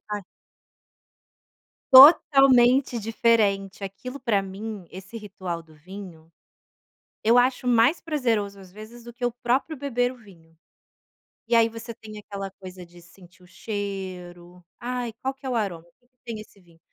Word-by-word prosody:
ca 205 Hz, -2 st, -4 dB, 1.7 s
Totalmente 265 Hz, -3 st, +7 dB
diferente, 210 Hz, -3 st, 0 dB
aquilo 250 Hz, +8 st, -8 dB
pra 215 Hz, -7 st, +1 dB
mim, 200 Hz, 0 st, -7 dB
esse 190 Hz, +5 st, -10 dB
ritual 185 Hz, -5 st, -6 dB
do 160 Hz, -1 st, -21 dB
vinho, 170 Hz, -1 st, -12 dB, 0.9 s
eu 230 Hz, +3 st, +4 dB
acho 250 Hz, 0 st, +2 dB
mais 245 Hz, +6 st, +3 dB
prazeroso, 225 Hz, -, -1 dB
às 185 Hz, -2 st, -15 dB
vezes, 215 Hz, +4 st, -12 dB
do 240 Hz, 0 st, -11 dB
que 245 Hz, 0 st, -4 dB
o 245 Hz, -, 0 dB
próprio 255 Hz, +6 st, -1 dB
beber 245 Hz, -3 st, -1 dB
o 255 Hz, -, -12 dB
vinho. 165 Hz, -7 st, -20 dB, 0.9 s
E 235 Hz, -, +2 dB
aí 230 Hz, 0 st, +5 dB
você 230 Hz, +1 st, -8 dB
tem 215 Hz, -1 st, -12 dB
aquela 195 Hz, -2 st, -7 dB
coisa 185 Hz, -2 st, -11 dB
de 175 Hz, 0 st, -17 dB
sentir 180 Hz, +1 st, -19 dB
o 180 Hz, -, -18 dB
cheiro, 180 Hz, -4 st, -7 dB, 0.2 s
ai 245 Hz, -1 st, -4 dB
qual 265 Hz, +1 st, -2 dB
que 270 Hz, 0 st, -18 dB
é -, -, -2 dB
o 245 Hz, -, -2 dB
aroma, 180 Hz, -7 st, -3 dB
que 245 Hz, -, -36 dB
que 250 Hz, -, -53 dB
tem 230 Hz, -3 st, -6 dB
esse 210 Hz, -1 st, -14 dB
vinho? 170 Hz, -2 st, -24 dB
215 Hz, 155 wpm, -24 LUFS, 190-245 Hz, 1.7 s, Totalmente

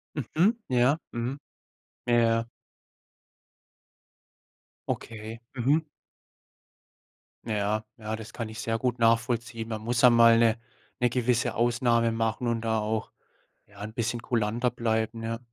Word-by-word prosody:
Mhm. 170 Hz, -, +1 dB
Ja. 130 Hz, +4 st, +3 dB
Mhm. 120 Hz, +4 st, -3 dB, 0.7 s
Ja, 120 Hz, -, +4 dB
ja. 115 Hz, 0 st, +2 dB, 2.4 s
Okay. 110 Hz, +1 st, -5 dB
Mhm. 140 Hz, +6 st, +2 dB, 1.6 s
Ja, 105 Hz, 0 st, -1 dB
ja, 110 Hz, 0 st, -4 dB
das 110 Hz, +1 st, -10 dB
kann 115 Hz, -2 st, -5 dB
ich 110 Hz, +2 st, -7 dB
sehr 115 Hz, -1 st, -1 dB
gut 125 Hz, -1 st, -1 dB
nachvollziehen. 115 Hz, 0 st, +1 dB
Man 110 Hz, -1 st, -4 dB
muss 120 Hz, +2 st, 0 dB
einmal 115 Hz, -2 st, +7 dB
'ne 115 Hz, 0 st, +4 dB, 0.4 s
'ne 125 Hz, -1 st, +3 dB
gewisse 120 Hz, -1 st, +1 dB
Ausnahme 120 Hz, 0 st, +2 dB
machen 115 Hz, +2 st, -1 dB
und 115 Hz, -1 st, 0 dB
da 110 Hz, -1 st, 0 dB
auch, 110 Hz, +1 st, -2 dB, 0.6 s
ja, 105 Hz, 0 st, -15 dB
'n 110 Hz, +1 st, -6 dB
bisschen 120 Hz, 0 st, -2 dB
kulanter 120 Hz, +1 st, 0 dB
bleiben, 115 Hz, -1 st, -1 dB
ja. 115 Hz, +1 st, -3 dB
115 Hz, 125 wpm, -27 LUFS, 110-120 Hz, 2.4 s, einmal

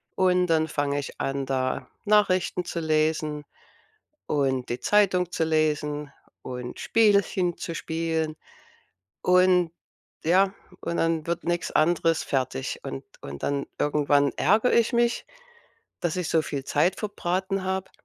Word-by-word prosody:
Und 180 Hz, -1 st, +3 dB
dann 160 Hz, -1 st, +2 dB
fange 145 Hz, -1 st, -1 dB
ich 140 Hz, -, -7 dB
an, 135 Hz, 0 st, -2 dB
da 130 Hz, -1 st, -2 dB, 0.2 s
Nachrichten 200 Hz, -4 st, +2 dB
zu 170 Hz, -, -4 dB
lesen 155 Hz, -1 st, 0 dB, 0.8 s
und 135 Hz, -3 st, 0 dB
die 120 Hz, -, -2 dB
Zeitung 185 Hz, -4 st, +2 dB
zu 165 Hz, -, 0 dB
lesen 150 Hz, -2 st, 0 dB, 0.3 s
und 125 Hz, -1 st, -6 dB
Spielchen 200 Hz, -5 st, +2 dB
zu 165 Hz, -, -5 dB
spielen. 160 Hz, -1 st, -2 dB, 0.8 s
Und 180 Hz, -2 st, +4 dB, 0.5 s
ja, 190 Hz, +4 st, +4 dB, 0.3 s
und 170 Hz, -, -3 dB
dann 165 Hz, -1 st, 0 dB
wird 170 Hz, -, -2 dB
nix 175 Hz, 0 st, -1 dB
anderes 165 Hz, 0 st, +2 dB
fertig. 130 Hz, -, -2 dB
Und 70 Hz, -, -6 dB, 0.2 s
und 70 Hz, 0 st, -8 dB
dann 140 Hz, -1 st, -1 dB
irgendwann 145 Hz, -1 st, +2 dB
ärgere 215 Hz, +7 st, +3 dB
ich 235 Hz, +1 st, +3 dB
mich, 235 Hz, 0 st, +1 dB, 0.8 s
dass 170 Hz, -3 st, -1 dB
ich 180 Hz, -3 st, -2 dB
so 160 Hz, -, +2 dB
viel 140 Hz, -3 st, -4 dB
Zeit 155 Hz, +7 st, +1 dB
verbraten 190 Hz, -2 st, -2 dB
habe 190 Hz, 0 st, -2 dB
165 Hz, 135 wpm, -26 LUFS, 145-185 Hz, 0.8 s, Und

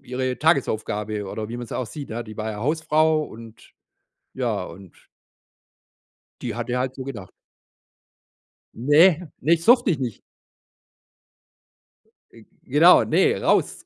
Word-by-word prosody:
ihre 130 Hz, -1 st, -3 dB
Tagesaufgabe 110 Hz, -8 st, -1 dB
oder 110 Hz, +1 st, -5 dB
wie 120 Hz, -, -6 dB
man 120 Hz, -, -6 dB
es -, -, -15 dB
auch 125 Hz, -, -3 dB
sieht, 140 Hz, +5 st, -9 dB
ja. 115 Hz, +1 st, -5 dB
Die 110 Hz, -1 st, -11 dB
war 110 Hz, 0 st, -3 dB
ja 105 Hz, -, -7 dB
Hausfrau 155 Hz, +3 st, +1 dB
und 115 Hz, -5 st, -12 dB, 0.6 s
ja, -, -, -2 dB
und 90 Hz, 0 st, -14 dB, 1.4 s
die 115 Hz, -3 st, -4 dB
hatte 120 Hz, +1 st, -3 dB
halt 130 Hz, 0 st, -2 dB
so 130 Hz, -, -7 dB
gedacht. 105 Hz, -9 st, -8 dB, 1.4 s
Ne, 150 Hz, +9 st, +5 dB, 0.3 s
ne, 165 Hz, +5 st, +4 dB
das 165 Hz, -, -11 dB
durfte 240 Hz, -1 st, +5 dB
ich 155 Hz, -, 0 dB
nicht. 125 Hz, -5 st, -5 dB, 2.1 s
Ge -, -, -17 dB, 0.2 s
genau, -, -, +6 dB
ne: -, -, +2 dB
„Raus!“ -, -, 0 dB
125 Hz, 135 wpm, -23 LUFS, 110-150 Hz, 2.1 s, genau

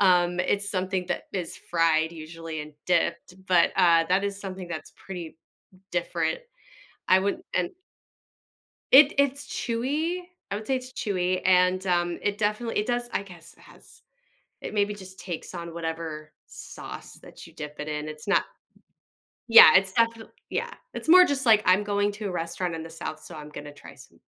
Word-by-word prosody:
Um, 180 Hz, -2 st, +4 dB
it's 200 Hz, +2 st, 0 dB
something 185 Hz, -1 st, -2 dB
that -, -, -2 dB
is 180 Hz, -4 st, -4 dB
fried 165 Hz, -1 st, +2 dB
usually 160 Hz, 0 st, -7 dB
and 150 Hz, -, -11 dB
dipped, 170 Hz, 0 st, 0 dB
but, 180 Hz, -3 st, +4 dB
uh, 170 Hz, -3 st, +5 dB
that 190 Hz, +2 st, +2 dB
is 200 Hz, 0 st, -3 dB
something 190 Hz, -2 st, -7 dB
that's 160 Hz, -3 st, -7 dB
pretty 175 Hz, -4 st, -8 dB, 0.5 s
different. -, -, -1 dB, 0.7 s
I 185 Hz, -, +7 dB
wouldn't 200 Hz, +1 st, -2 dB
an 180 Hz, -1 st, 0 dB, 1.2 s
It 280 Hz, +2 st, +8 dB
it's 280 Hz, 0 st, +1 dB
chewy. 290 Hz, +9 st, -2 dB, 0.3 s
I 200 Hz, -, -1 dB
would 215 Hz, -, -7 dB
say 265 Hz, -, +1 dB
it's 255 Hz, 0 st, -8 dB
chewy, 185 Hz, -5 st, -1 dB
and, 185 Hz, 0 st, +4 dB
um, 175 Hz, -1 st, +1 dB
it 205 Hz, 0 st, 0 dB
definitely 215 Hz, +2 st, -1 dB
it 210 Hz, -, 0 dB
does 240 Hz, 0 st, -1 dB
I -, -, -1 dB
guess 175 Hz, -5 st, -14 dB
it -, -, -23 dB
has -, -, -19 dB, 0.6 s
It -, -, -6 dB
maybe 205 Hz, 0 st, +1 dB
just 190 Hz, -1 st, -12 dB
takes 175 Hz, -4 st, -6 dB
on 170 Hz, -1 st, -6 dB
whatever 160 Hz, -2 st, -5 dB
sauce -, -, -10 dB
that -, -, -13 dB
you -, -, -16 dB
dip 150 Hz, 0 st, -8 dB
it 150 Hz, -, -5 dB
in. 150 Hz, 0 st, -4 dB
It's 155 Hz, +4 st, -9 dB
not 195 Hz, -, +3 dB, 1.0 s
Yeah, 225 Hz, -8 st, +10 dB
it's 190 Hz, 0 st, +3 dB
definite 230 Hz, -1 st, 0 dB, 0.2 s
yeah. -, -, -3 dB, 0.2 s
It's -, -, -6 dB
more 365 Hz, +2 st, +9 dB
just 275 Hz, -3 st, -1 dB
like 215 Hz, -2 st, +6 dB
I'm 185 Hz, +3 st, +4 dB
going 205 Hz, 0 st, +1 dB
to 210 Hz, +1 st, -6 dB
a -, -, -4 dB
restaurant 170 Hz, 0 st, -3 dB
in 160 Hz, -, -5 dB
the 165 Hz, -, -9 dB
South, 160 Hz, -1 st, -7 dB
so 175 Hz, -, -11 dB
I'm 150 Hz, 0 st, -9 dB
gonna 145 Hz, -1 st, -9 dB
try 145 Hz, -, -13 dB
some -, -, -17 dB
185 Hz, 180 wpm, -26 LUFS, 165-210 Hz, 1.2 s, Yeah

